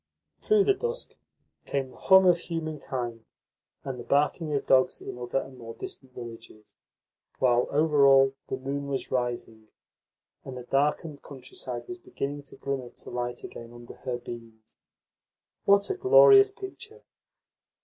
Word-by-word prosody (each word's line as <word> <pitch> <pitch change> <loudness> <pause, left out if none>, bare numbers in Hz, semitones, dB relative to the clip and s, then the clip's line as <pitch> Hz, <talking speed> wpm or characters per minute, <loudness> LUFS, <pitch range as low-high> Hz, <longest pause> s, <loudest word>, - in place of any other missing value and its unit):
Through 425 -1 +4
the 400 - +4
dusk 475 +4 -4 0.5
came 135 -2 -2
the - - -16
hum 190 0 +6
of 175 -1 +5
humankind, 140 -9 -5 0.6
and 130 -2 -5
the - - -6
barking 150 +4 +1
of 140 -2 -1
dogs 130 -1 +3
in 125 - -8
other 120 +2 -2
and 130 -1 -10
more 115 -1 -9
distant 130 -2 -9
villages; 115 -3 -11 0.6
while, 125 -2 +3
over 150 -1 +4
all, 135 0 +6
the - - -3
moon 140 +2 -4
was 135 -1 -3
rising, 120 -3 -3 0.8
and 130 -1 -8
the 125 - -7
darkened 145 +3 0
countryside 125 -2 -7
was 180 0 -7
beginning 145 -4 -5
to - - -10
glimmer 135 -3 -4
to - - -13
light 120 0 -4
again 115 0 -9
under 120 0 -11
her 125 -2 -4
beams. 115 -2 -11 0.9
What 200 0 +5
a 390 - -3
glorious 405 0 +7
picture! 430 +3 -10
135 Hz, 150 wpm, -27 LUFS, 120-165 Hz, 0.9 s, glorious